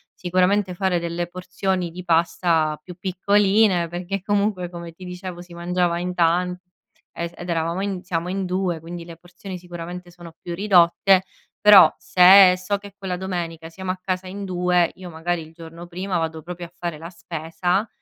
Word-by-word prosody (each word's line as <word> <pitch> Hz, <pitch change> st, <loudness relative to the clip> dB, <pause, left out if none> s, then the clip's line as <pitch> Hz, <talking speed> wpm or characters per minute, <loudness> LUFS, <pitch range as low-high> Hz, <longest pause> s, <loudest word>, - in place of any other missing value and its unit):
sicuramente 185 Hz, +2 st, +1 dB
fare 185 Hz, -1 st, +1 dB
delle 170 Hz, +1 st, -3 dB
porzioni 180 Hz, 0 st, -2 dB
di 180 Hz, +2 st, -8 dB
pasta 165 Hz, -2 st, +1 dB
più 180 Hz, -, -10 dB
piccoline 195 Hz, -1 st, +2 dB
perché 180 Hz, +3 st, -4 dB
comunque 200 Hz, -2 st, 0 dB
come 170 Hz, -1 st, -8 dB
ti 185 Hz, -, -13 dB
dicevo 180 Hz, 0 st, -7 dB
si 175 Hz, 0 st, -13 dB
mangiava 175 Hz, 0 st, 0 dB
in 180 Hz, +1 st, -3 dB
tan 180 Hz, +1 st, +2 dB, 0.6 s
e 170 Hz, 0 st, -5 dB
ed 175 Hz, 0 st, -8 dB
eravamo 170 Hz, +2 st, -1 dB
in 195 Hz, -2 st, -3 dB
siamo 175 Hz, -2 st, -2 dB
in 190 Hz, +1 st, -2 dB
2 180 Hz, -2 st, -1 dB
quindi 170 Hz, +1 st, -8 dB
le 165 Hz, -1 st, -11 dB
porzioni 180 Hz, +2 st, -9 dB
sicuramente 175 Hz, 0 st, -8 dB
sono 170 Hz, -1 st, -12 dB
più 175 Hz, -, -6 dB
ridotte, 190 Hz, 0 st, +4 dB, 0.4 s
però 210 Hz, -2 st, +8 dB
se 185 Hz, +1 st, +7 dB
so 185 Hz, +2 st, -2 dB
che 200 Hz, 0 st, -12 dB
quella 190 Hz, -3 st, -4 dB
domenica 170 Hz, -3 st, -4 dB
siamo 190 Hz, +2 st, -7 dB
a 185 Hz, -, -6 dB
casa 185 Hz, 0 st, -3 dB
in 200 Hz, +2 st, -6 dB
2 180 Hz, -2 st, +1 dB
io 185 Hz, -1 st, -9 dB
magari 170 Hz, +1 st, -2 dB
il 160 Hz, 0 st, -12 dB
giorno 165 Hz, +1 st, -11 dB
prima 185 Hz, +1 st, -3 dB
vado 160 Hz, -1 st, -3 dB
proprio 175 Hz, 0 st, -7 dB
a -, -, -26 dB
fare 170 Hz, -3 st, -4 dB
la 165 Hz, -, -8 dB
spesa, 175 Hz, +4 st, -2 dB
180 Hz, 175 wpm, -22 LUFS, 170-185 Hz, 0.6 s, però